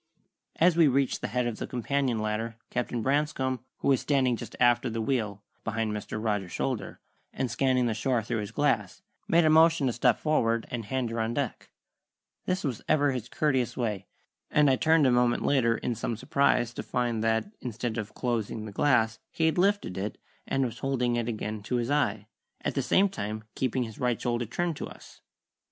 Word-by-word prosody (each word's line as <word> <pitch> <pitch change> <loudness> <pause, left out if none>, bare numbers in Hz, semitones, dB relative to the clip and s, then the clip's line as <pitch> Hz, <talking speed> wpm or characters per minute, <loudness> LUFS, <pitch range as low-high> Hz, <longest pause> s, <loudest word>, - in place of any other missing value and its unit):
'" - - -54
As 170 +1 +4
we 165 -2 +6
reached 135 0 +1
the - - -2
head 125 +3 0
of 120 -2 -3
the - - -4
companion 130 0 0
ladder 110 +1 -2 0.2
Captain 120 -1 -2
Branscome, 135 -2 0 0.2
who - - +1
was 135 -3 +4
standing 130 -4 +2
just - - -8
aft 120 +1 +4
of 120 - -2
the 115 - -2
wheel, 110 -5 -1 0.2
behind 110 0 -1
Mr. 105 0 -4
Rogers's 105 -5 -1
shoulder, - - -3 0.3
and 130 -3 -2
scanning 130 0 +2
the 115 - +1
shore 120 +1 0
through 110 - -2
his 105 -1 -4
glass, 110 -7 0 0.2
made 170 0 +4
a - - +5
motion 160 -2 +5
to 125 - +1
step 120 0 +3
forward 115 -7 +1
and 115 -3 -3
hand 125 +1 -2
her 115 - -2
on 115 +1 -1
deck. 135 -4 -3 0.8
This 185 +1 0
was 130 -8 -2
ever 145 -2 +4
his 125 -2 -4
courteous 130 -5 0
way, 105 -6 -2 0.4
and 150 -2 +4
I - - +4
turned 160 +2 +4
a 130 - +5
moment 120 0 +2
later 115 -5 +3
in 120 - -2
some 115 0 -3
surprise, 140 -4 +2
to - - -4
find 120 -3 -1
that, 115 - +1
instead 120 -1 -3
of 105 0 -6
closing 115 -3 -2
the 105 - -7
glass, 110 -2 +2
he 160 - 0
had 160 +1 +2
lifted 195 - +1
it, 100 +2 -4 0.3
and 135 -1 +1
was 120 0 -5
holding 125 -3 0
it 120 0 -1
again 105 -1 -4
to 115 +5 -3
his 120 +2 -1
eye, 110 -8 +1 0.4
at - - -2
the - - 0
same 200 +1 +4
time 110 - -5
keeping 130 0 0
his 110 -2 -8
right 125 -2 0
shoulder 120 -1 -1
turned 170 +5 -2
to - - -4
us. - - -14
120 Hz, 205 wpm, -28 LUFS, 110-135 Hz, 0.8 s, we